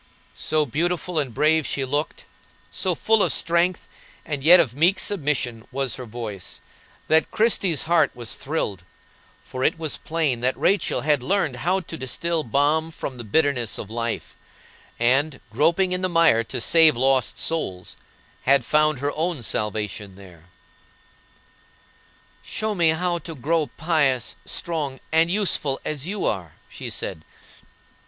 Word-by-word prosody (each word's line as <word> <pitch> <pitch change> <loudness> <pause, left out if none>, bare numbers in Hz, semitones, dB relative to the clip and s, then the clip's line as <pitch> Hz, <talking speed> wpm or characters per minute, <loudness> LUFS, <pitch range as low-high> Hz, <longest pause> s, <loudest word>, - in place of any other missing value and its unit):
So 155 -1 0
beautiful 170 +4 -1
and 140 -4 -2
brave 155 +5 +2
she 135 - -1
looked, 145 +4 -2 0.5
so 185 -2 -1
full 225 +4 +3
of - - +3
strength 170 +2 +1 0.4
and 145 -4 -4
yet 175 +4 +8
of 140 -9 +2
meek 170 +8 +3
submission 135 - -2
was 135 -1 -2
her 125 -2 -8
voice, 110 -5 -6 0.5
that 160 +1 +3
Christie's 200 - +1
heart 160 -3 +3
was 120 0 -4
thrilled; 110 - -3 0.6
for 130 0 -5
it - - +2
was 160 -2 -3
plain 155 -7 -1
that 125 +2 0
Rachel 200 - +1
had 150 -3 +2
learned 160 -4 0
how 180 +8 0
to 165 - -8
distil 160 +5 -2
balm 145 +6 +1
from 135 -5 -7
the - - -5
bitterness 125 -1 +1
of 105 - -7
life, 115 0 -4 0.6
and, 130 +4 +2
groping 170 +4 +2
in 180 0 -1
the 185 - 0
mire 165 -9 +4
to - - -4
save 160 +1 +5
lost 130 -2 +2
souls, 95 - -2 0.5
had 135 -2 +4
found 155 -3 +2
her 145 +1 0
own 160 -4 -2
salvation 105 -2 -3
there. 90 -4 -15 2.0
"Show 215 0 -3
me 170 -4 +3
how 175 +2 0
to 165 0 -8
grow 150 +3 0
pious, 145 -7 +1
strong, 150 -6 -3
and 160 +1 +4
useful, 175 -8 +2
as 150 0 -3
you 205 +1 -3
are," 90 -7 -2 0.2
she - - -7
said. 80 - -5
150 Hz, 145 wpm, -23 LUFS, 125-165 Hz, 2.0 s, yet